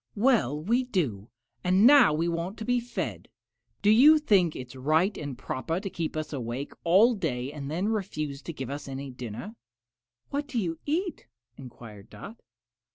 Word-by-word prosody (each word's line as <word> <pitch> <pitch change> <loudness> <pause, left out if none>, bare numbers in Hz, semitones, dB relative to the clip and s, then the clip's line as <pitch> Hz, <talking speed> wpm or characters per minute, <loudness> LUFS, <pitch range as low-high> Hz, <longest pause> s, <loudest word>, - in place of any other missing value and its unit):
"Well 210 - +2
we 235 +11 +1
do, 140 - -2 0.3
and 185 +3 +4
now 280 - +8
we 160 +3 0
want 170 +4 -3
to 220 - -6
be 245 +1 +2
fed. 240 +1 -5 0.5
Do 205 - +5
you 285 +8 +7
think 195 - +2
it 125 -1 -7
is 130 - -12
right 155 +9 +1
and 145 -4 -6
proper 160 +7 -3
to 195 0 -5
keep 165 -2 -4
us 155 0 -4
awake 125 +1 -4
all 195 +8 +5
day 140 - -3
and 140 -2 -6
then 175 +6 -1
refuse 155 -10 -3
to 170 - -6
give 135 -4 -6
us 145 0 -6
any 135 0 -6
dinner?" 125 - -7 0.8
"What 285 +1 -2
do 255 - -5
you 170 -7 -2
eat?" 340 - -2 0.3
enquired 115 -5 -12
Dot. 225 +3 -11
165 Hz, 175 wpm, -27 LUFS, 135-220 Hz, 0.8 s, now